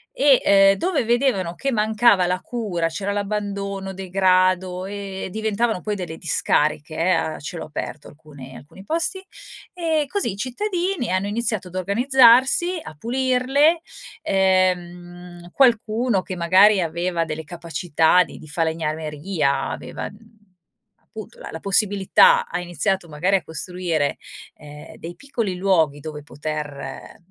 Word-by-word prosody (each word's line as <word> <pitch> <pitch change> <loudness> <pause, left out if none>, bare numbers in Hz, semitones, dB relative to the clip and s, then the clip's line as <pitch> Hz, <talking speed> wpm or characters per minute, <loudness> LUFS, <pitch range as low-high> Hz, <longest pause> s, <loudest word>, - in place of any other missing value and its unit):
e, 275 -2 +4
ehm, 195 0 +5
dove 330 - 0
vedevano 235 -8 +1
che 275 +8 -2
mancava 215 -3 +3
la 180 +1 0
cura, 195 -9 -3
c'era 195 +5 -3
l'abbandono, 200 -1 -4
degrado 185 -1 +1
e 195 -1 -6
diventavano 220 0 -1
poi 210 +2 -3
delle 175 -5 -6
discariche, 155 -1 +1
eh, 165 - 0
a 160 -2 -1
cielo 165 +3 -6
aperto 150 -1 -7
alcune 145 -3 -13
alcuni 170 +7 -14
posti. 335 - -1 0.5
E 325 -4 0
così 395 - -1
i - - -9
cittadini 345 - -2
hanno 185 +2 0
iniziato 210 -3 -1
ad 180 - -10
organizzarsi, 255 - +4
a - - -10
pulirle. 260 - +1 0.4
Ehm, 180 -2 -1
qualcuno 230 -3 +2
che 185 - -7
magari 185 +3 +5
aveva 170 +1 -1
delle 160 0 -6
capacità 170 +1 +1
di - - -9
di 155 - -13
falegnameria, 155 -1 -2
aveva, - - -6
mhmm, 200 - -16 0.9
appunto 215 -2 -11
la - - -9
la 160 - -8
possibilità, 205 - +4
ha - - -4
iniziato 175 +1 -2
magari 180 +6 +1
a 190 - -3
costruire, 165 -2 -2 0.4
ehm, 150 +1 -12
dei 170 +1 -8
piccoli 235 -9 -3
luoghi 165 -6 +1
dove 150 0 -7
poter 150 -1 -7
190 Hz, 130 wpm, -22 LUFS, 170-225 Hz, 0.9 s, ehm